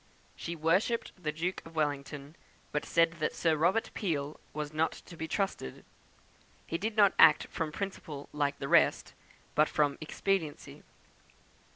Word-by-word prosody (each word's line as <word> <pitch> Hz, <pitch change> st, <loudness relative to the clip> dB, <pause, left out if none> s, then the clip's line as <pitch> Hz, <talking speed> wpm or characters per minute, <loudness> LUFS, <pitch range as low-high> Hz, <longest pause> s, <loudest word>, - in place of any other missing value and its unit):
She 170 Hz, -, -5 dB
worshipped 185 Hz, +9 st, +1 dB
the 155 Hz, -5 st, -3 dB
Duke 170 Hz, +4 st, -3 dB
of 165 Hz, 0 st, -13 dB
Wellington, 145 Hz, 0 st, -2 dB, 0.4 s
but 150 Hz, -, -1 dB
said 165 Hz, 0 st, +3 dB
that 155 Hz, -, -1 dB
Sir 165 Hz, -2 st, +2 dB
Robert 175 Hz, +9 st, +2 dB
Peel 150 Hz, -6 st, -2 dB
was 150 Hz, 0 st, -4 dB
not 160 Hz, +1 st, +1 dB
to 175 Hz, -, -12 dB
be 160 Hz, -1 st, -4 dB
trusted; 190 Hz, -, -3 dB, 0.8 s
he 165 Hz, -, -3 dB
did 220 Hz, +3 st, -3 dB
not 200 Hz, -2 st, +6 dB
act 155 Hz, -2 st, +8 dB
from 160 Hz, -3 st, -2 dB
principle 155 Hz, -6 st, -5 dB
like 145 Hz, -1 st, 0 dB
the 135 Hz, -, -4 dB
rest, -, -, +3 dB, 0.4 s
but 155 Hz, 0 st, +4 dB
from 145 Hz, -2 st, +1 dB
expediency. 160 Hz, -1 st, -2 dB
160 Hz, 150 wpm, -31 LUFS, 150-175 Hz, 0.8 s, act